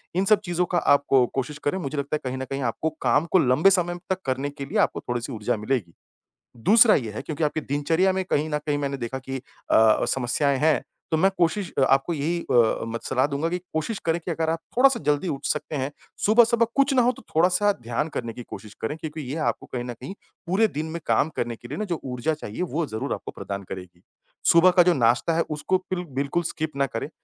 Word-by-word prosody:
इन 190 +2 +2
सब 210 +1 +5
चीज़ों 175 0 0
का - - +4
आप 145 -4 +4
को 130 -2 +5
कोशिश 135 +2 -2
करें, 145 +6 +1
मुझे 150 -3 -4
लगता 140 +1 -1
है - - -2
कहीं 130 - -4
न 130 - -3
कहीं 135 0 -2
आपको 160 - -2
काम 130 +5 +3
को 185 - +5
लंबे 140 +6 +4
समय 175 -2 +1
तक 190 0 -1
करने 135 +2 -1
के 140 -1 -7
लिए - - -3
आपको - - -8
थोड़ी-सी 120 +2 -4
ऊर्जा 110 -1 -1
मिलेगी। 105 -5 -2 0.6
दूसरा 215 - +6
ये 115 -6 -2
है 110 - -5
क्योंकि 155 0 -4
आपकी 150 +1 0
दिनचर्या 160 +7 +1
में 190 0 -1
कहीं 155 -3 0
न 150 - 0
कहीं 145 -1 +1
मैंने 140 -1 -2
देखा 130 +1 -4
कि 135 0 -5 0.3
अ - - +5
अ, 110 -1 +5
समस्याएँ 135 +2 +1
हैं, 155 +2 +3 0.3
तो 160 - +3
मैं 190 +5 +4
कोशिश 175 +1 +1
अ, - - +3
आपको 135 +5 +2
यही 160 +3 -1
अ, 115 -2 +3
मत 115 0 -5
सलाह 130 +1 +1
दूँगा 145 +3 -1
कि 180 - -1 0.2
कोशिश 160 +7 -2
करें 165 +1 +1
कि 170 - -4
अगर 160 0 -1
आप 165 - -1 0.2
थोड़ा-सा 265 -1 +5
जल्दी 150 +5 +1
उठ 140 -1 -4
सकते 150 0 -2
हैं, 135 0 -2 0.3
सुबह 220 +3 +7
सुबह 230 0 +2
कुछ 275 0 +3
ना 255 - +5
हो 245 - +4
तो - - -14
थोड़ा-सा 180 +5 +4
ध्यान 120 +5 -2
करने 115 -6 -4
की 125 - -8
कोशिश 105 -2 -10
करें, 130 +7 -2
क्योंकि 155 0 -6
यह 155 0 -2
आपको - - -1
कहीं 125 -1 -2
न 120 0 -5
कहीं 130 +9 -8 0.3
पूरे 200 +6 +3
दिन 155 -5 -4
में 170 - -4
काम 155 - +3
करने 120 -1 -2
के 120 - -13
लिए 145 +5 -6
ना 215 - -2
जो 175 -5 -3
ऊर्जा 125 +4 -1
चाहिए 150 -2 -6
वो 170 -2 -1
ज़रूर 110 0 -3
आपको - - -6
प्रदान 100 0 -6
करेगी। 90 -2 -9 0.5
सुबह 170 +2 +6
का 175 - +9
जो 180 0 +4
नाश्ता 125 +4 +2
है 165 - +2
उसको 150 +5 0
पिल 180 -1 -2
बिल्कुल 140 +5 0
स्किप 160 -1 -3
ना 140 - +3
करें। 115 +4 -5
150 Hz, 240 wpm, -24 LUFS, 130-175 Hz, 0.6 s, का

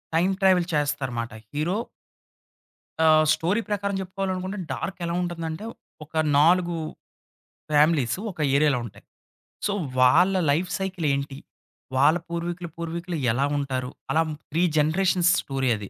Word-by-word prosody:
Time 180 +4 +3
travel 185 -2 +4
చేస్తారు 145 -3 0
మాట 115 0 -4 0.2
hero 155 +7 -1 1.3
ఆహ్, 155 0 +6
స్టోరీ 185 +8 0
ప్రకారం 200 -1 -1
జెప్పుకోవాలనుకుంటే 190 +1 -3
డార్క్ 195 0 -4
ఎలా 170 - -2
ఉంటుందంటే 165 +1 -4 0.4
ఒక 150 - -25 0.3
4 175 +3 +4 1.0
ఫ్యామిలీసు 150 -2 +3
ఒక 170 - -17 0.2
ఏరియాలో 145 -4 +3
ఉంటాయి. 100 -2 -13 0.6
సో 205 - +1 0.3
వాళ్ళ 175 +10 +5 0.2
లైఫ్ 170 +5 0
సైకిల్ 185 -4 -3
ఏంటి? 140 0 -3 0.6
వాళ్ళ 145 +6 +5
పూర్వీకులు 170 0 -4
పూర్వీకులు 170 +1 -4
ఎలా 130 +4 +1
ఉంటారు? 130 -3 -2 0.2
అలా 160 - +3 0.3
3 165 +3 +1 0.2
జనరేషన్స్ 175 +3 +3
స్టోరీ 135 -2 -1
అది. 100 -2 -8
165 Hz, 125 wpm, -25 LUFS, 145-180 Hz, 1.3 s, ఆహ్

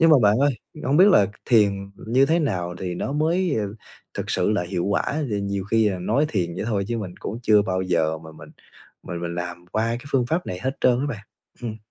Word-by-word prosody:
Nhưng 165 0 +6
mà 150 - +8
bạn 105 +2 +4
ơi, 140 +2 +4 0.3
hông 135 +3 +2
biết 195 +3 +8
là 105 - +6 0.2
thiền 100 -4 +3
như 130 +5 +2
thế 165 +3 +3
nào 90 - -1
thì 90 -2 -3
nó 135 - -3
mới, 165 +2 +1
ờ, 100 0 -4 0.4
thực - - -4
sự - - +1
là 105 -4 +1
hiệu 90 0 -2
quả? 100 - +1
Ờ, 150 +1 -2 0.2
nhiều 100 -1 -2
khi 110 +1 +3
là 95 -3 -2
nói 115 +11 +1
thiền 85 -5 -1
vậy - - -3
thôi 100 -3 0
chứ 120 -1 -1
mình 95 -4 -6
cũng 110 - -4
chưa 105 -2 +5
bao 95 -2 -1
giờ 80 -3 +1
mà 80 0 -12
mình - - -13 0.5
mình 85 -1 -5
mình 85 0 -3
làm 85 0 -5
qua 110 +1 +1
cái 120 +3 -3
phương 125 -3 +2
pháp 165 +7 -1
này 90 - -4
hết 135 +1 -2
trơn 125 -1 +3
á 145 - -1
bạn, 110 -7 -5 0.4
ừm. 110 -2 -4
105 Hz, 245 wpm, -23 LUFS, 90-130 Hz, 0.5 s, mà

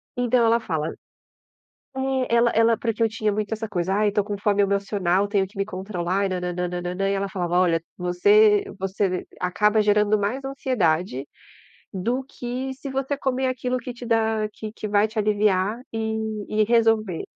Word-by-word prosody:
Então 245 -1 +2
ela 230 +1 +4
fala 160 -8 -2 1.1
é, 265 -2 0
ela 235 0 +4
ela 225 0 +3
porque 230 -1 -3
eu 225 - +4
tinha 215 -1 -1
muito 210 +1 -3
essa 220 0 -3
coisa: 185 -1 -1
"Ai, 210 0 +3
eu - - -7
tô 205 -1 +2
com 205 0 -4
fome 205 0 +2
emocional, 200 -1 +1
tenho 200 -2 +1
que 200 +2 -18
me 195 - 0
controlar 190 -1 -2
e - - -5
nanananananã", 180 +1 -2
e - - +1
ela 200 0 -1
falava: 175 -2 -1
"Olha, 170 -3 +2 0.2
você 205 +4 +4 0.2
você 190 -1 -1
acaba 210 +4 +2
gerando 210 0 +3
mais 225 +7 -2
ansiedade, 180 - 0 0.7
do 235 +8 -2
que 255 0 -5
se 270 +2 -8
você 270 +1 -2
comer 265 -1 0
aquilo 255 0 -2
que 250 +1 -6
te 240 0 -9
dá 220 -2 +1
que 215 -1 -7
que 215 - -6
vai 205 +1 +3
te 220 +1 -7
aliviar 210 0 +2
e 220 0 -2 0.3
e 215 0 +2
resolver". 225 -5 +2
210 Hz, 175 wpm, -24 LUFS, 190-230 Hz, 1.1 s, ela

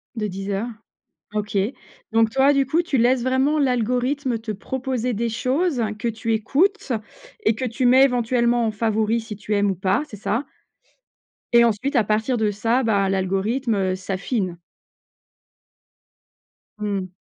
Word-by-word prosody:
De 210 -2 -2
Deezer. 195 +3 -3 0.7
OK. 210 -1 -2 0.5
Donc, 225 0 +3
toi, 270 +4 +4
du 275 -1 +2
coup 330 +5 +2
tu 330 -6 0
laisses 245 +1 +3
vraiment 260 +4 +2
l'algorithme 250 0 0
te 225 0 -5
proposer 250 +3 -3
des 230 +2 -1
choses 255 +5 0 0.2
que 215 - -3
tu 225 0 -1
écoutes 295 - +1 0.5
et 220 - +3
que 255 - -3
tu 250 +2 -1
mets 260 +2 +7
éventuellement 240 -2 +2
en 220 - 0
favori 220 +1 0
si 225 -1 -7
tu 210 +1 -3
aimes 200 -1 +2
ou - - -3
pas, 190 - +1
c'est 210 - -10
ça? 220 +7 -1 1.1
Et 235 - +7
ensuite 235 +5 0
à 235 - +4
partir 220 +4 0
de 215 -1 +1
ça, 230 +5 +1
bah, 200 -4 +2
l'algorithme 195 +1 0
s'affine. 190 0 -3 2.2
Mmh. 200 -3 -3
230 Hz, 145 wpm, -22 LUFS, 210-260 Hz, 2.2 s, mets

